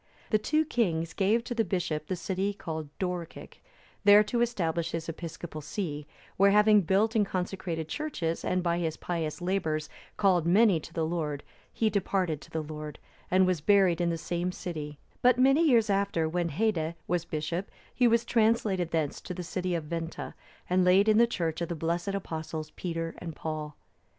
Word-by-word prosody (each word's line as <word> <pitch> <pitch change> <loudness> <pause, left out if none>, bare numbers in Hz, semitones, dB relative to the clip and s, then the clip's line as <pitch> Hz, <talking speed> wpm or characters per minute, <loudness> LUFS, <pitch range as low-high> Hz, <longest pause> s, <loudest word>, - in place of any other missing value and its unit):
The 215 - +4
two 310 +8 +1
kings 170 - 0
gave 215 +4 +2
to 240 - -4
the 230 -1 +1
bishop 165 -6 -2
the 185 - -1
city 190 +3 -2
called 160 -6 -5
Dorcic,(321) 180 -3 -5 0.5
there 205 +1 +8
to 235 +3 -1
establish 170 -9 -1
his 165 -1 -3
episcopal 165 -1 -6
see; 150 -2 -4 0.3
where 200 +1 +6
having 210 +1 +6
built 200 +6 +2
and 215 - +4
consecrated 180 -4 -3
churches, 170 - -3
and 185 0 0
by 170 -1 +1
his 160 -2 -2
pious 165 -2 -3
labours 160 -5 -1 0.3
called 180 -5 +3
many 195 -1 +5
to 155 - -11
the 165 -1 -1
Lord, 155 -4 -2 0.3
he 220 -1 +1
departed 185 -6 0
to - - -14
the 160 -1 -3
Lord, 150 -1 -7 0.3
and 185 +1 +4
was 180 -4 0
buried 190 -2 +4
in 170 - +2
the 165 - -1
same 175 +2 -2
city; 150 -5 -6 0.2
but 250 0 +5
many 270 +5 +5
years 230 -4 +4
after, 195 -5 +1
when 170 +1 -1
Haedde 165 -2 0
was 175 -1 0
bishop,(322) 165 +4 -3 0.2
he 250 - +4
was 230 0 +3
translated 220 -7 +2
thence 160 -4 -1
to 180 - -6
the 180 - -5
city 180 +1 -2
of 165 - -2
Venta,(323) 165 +1 -5 0.3
and 180 +1 +3
laid 190 +4 +5
in 215 +1 +5
the 235 - +6
church 170 -7 -2
of 170 - -2
the 170 - -2
blessed 170 +5 -1
Apostles, 160 -4 -5
Peter 165 -2 -4
and 165 -3 -7
Paul. 155 -2 -5
175 Hz, 185 wpm, -29 LUFS, 160-200 Hz, 0.5 s, there